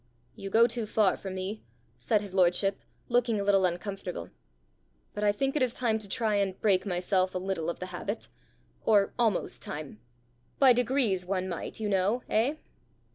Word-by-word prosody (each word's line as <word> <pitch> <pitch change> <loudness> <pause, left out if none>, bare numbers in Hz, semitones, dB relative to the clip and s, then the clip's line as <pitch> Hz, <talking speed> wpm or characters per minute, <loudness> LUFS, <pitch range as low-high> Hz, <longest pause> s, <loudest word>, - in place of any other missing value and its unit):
"You 195 - -6
go 225 +4 +6
too 235 -2 -2
far 210 -3 +3
for 195 - -7
me," 190 +3 -4 0.4
said 215 -3 +1
his 200 -3 -7
lordship, 190 +1 +2 0.3
looking 240 -3 +2
a - - -1
little 195 -1 +4
uncomfortable, 180 - -4 0.8
"but 210 - -4
I 205 - +5
think 270 +7 -1
it 300 - +1
is 255 -2 +1
time 225 -3 +1
to 210 - -9
try 215 -1 0
and 195 -2 -1
break 195 -3 +2
myself 185 0 0
a - - +2
little 185 -3 -2
of 170 - -4
the 185 - -4
habit 200 +5 -4 0.6
or 205 -3 +3
almost 225 -6 0
time. 145 -7 -7 0.6
By 265 -2 +7
degrees 240 -6 +1
one 185 -1 -1
might, 175 +3 -5
you 215 - -2
know, 205 +5 +1
eh?" 240 +8 +2
200 Hz, 180 wpm, -29 LUFS, 185-225 Hz, 0.8 s, By